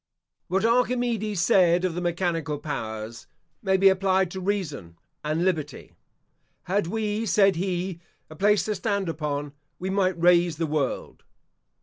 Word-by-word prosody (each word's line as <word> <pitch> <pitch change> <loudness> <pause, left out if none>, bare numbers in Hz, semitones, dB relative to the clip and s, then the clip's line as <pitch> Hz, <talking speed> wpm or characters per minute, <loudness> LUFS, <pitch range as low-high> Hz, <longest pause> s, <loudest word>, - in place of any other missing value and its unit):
What 190 +4 0
Archimedes 235 -4 +1
said 175 0 +4
of 180 - -1
the 175 - -3
mechanical 170 -3 -1
powers, 110 -6 -6 0.3
may 190 -1 +2
be 195 +1 +5
applied 190 -1 +2
to 190 - -5
Reason 155 - -3 0.3
and 155 +3 0
Liberty. 155 -6 -2 0.7
"Had 195 0 0
we," 215 +2 -2
said 195 -1 +4
he, 180 0 -2 0.3
"a 155 - -12
place 205 +4 +3
to 215 - -1
stand 200 -1 -1
upon, 145 -3 -3 0.2
we 190 +1 -3
might 190 -3 +1
raise 175 -2 +4
the 165 - 0
world." 150 -3 -3
180 Hz, 140 wpm, -25 LUFS, 160-195 Hz, 0.7 s, be